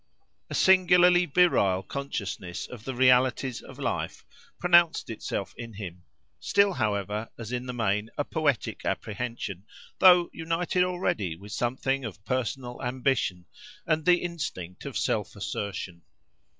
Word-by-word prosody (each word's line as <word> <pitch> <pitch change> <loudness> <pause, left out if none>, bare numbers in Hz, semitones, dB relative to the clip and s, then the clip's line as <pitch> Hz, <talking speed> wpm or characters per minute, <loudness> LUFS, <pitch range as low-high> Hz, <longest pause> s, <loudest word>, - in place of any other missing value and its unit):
A - - -4
singularly 180 -1 +5
virile 100 - +3
consciousness 100 -8 -5
of 120 -3 -11
the 130 - -4
realities 130 0 +3
of - - -12
life - - -3 0.3
pronounced 170 -6 +4
itself 100 -3 -4
in 115 -1 -8
him; 90 -4 -8 0.4
still 200 -1 +3
however 105 - -2
as 115 -1 -7
in 125 0 -3
the 125 - -4
main 105 -2 0
a 145 - +1
poetic 145 -5 -1
apprehension, 110 -4 -4 0.4
though 180 -2 +7
united 165 +2 0
already 175 - -1
with 100 +4 -12
something 130 +5 -1
of 105 -2 -8
personal 125 +1 -3
ambition 125 -8 -1 0.4
and 155 0 +1
the 175 +2 +4
instinct 145 - -5
of - - -4
self - - -1
assertion. 90 -3 -5
125 Hz, 130 wpm, -27 LUFS, 105-165 Hz, 0.4 s, though